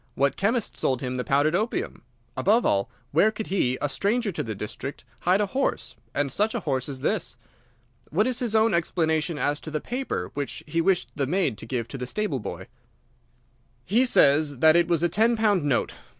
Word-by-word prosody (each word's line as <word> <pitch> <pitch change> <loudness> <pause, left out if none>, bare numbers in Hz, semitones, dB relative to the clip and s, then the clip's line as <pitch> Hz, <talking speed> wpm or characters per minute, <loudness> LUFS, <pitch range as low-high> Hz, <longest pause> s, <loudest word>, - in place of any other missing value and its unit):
What 140 0 +1
chemist 225 +3 0
sold 130 -2 0
him 130 -1 -3
the 125 - -1
powdered 145 +4 +2
opium? 235 - -2 0.3
Above 225 +4 +3
all, 100 0 +1 0.2
where 170 +9 +4
could 220 0 -5
he, 130 -9 +1
a 145 - +1
stranger 205 - 0
to - - -3
the 110 -3 -4
district, 105 +7 -6
hide 185 +3 +2
a - - +2
horse, 265 +8 -2 0.2
and 145 -1 0
such 215 - 0
a 235 - -2
horse 135 -4 -2
as 135 -2 -6
this? - - -1 0.7
What 195 +8 +2
is 255 -2 0
his 235 -3 -1
own 220 -1 +4
explanation 160 -1 0
as 145 0 0
to - - -8
the 155 0 -2
paper 255 - -4
which 140 -1 -4
he 165 +2 0
wished 185 +1 +1
the 140 -2 -1
maid 175 - +1
to 115 - -7
give 120 -2 -2
to 135 - -7
the 125 - -4
stable 175 -3 -1
boy?" - - -6 1.2
"He 230 - +3
says 145 - +4
that 155 +4 +5
it 170 0 +4
was 170 -1 +1
a - - +5
ten 225 +6 +2
pound 205 -7 +2
note. 140 -4 0
165 Hz, 205 wpm, -25 LUFS, 140-210 Hz, 1.2 s, that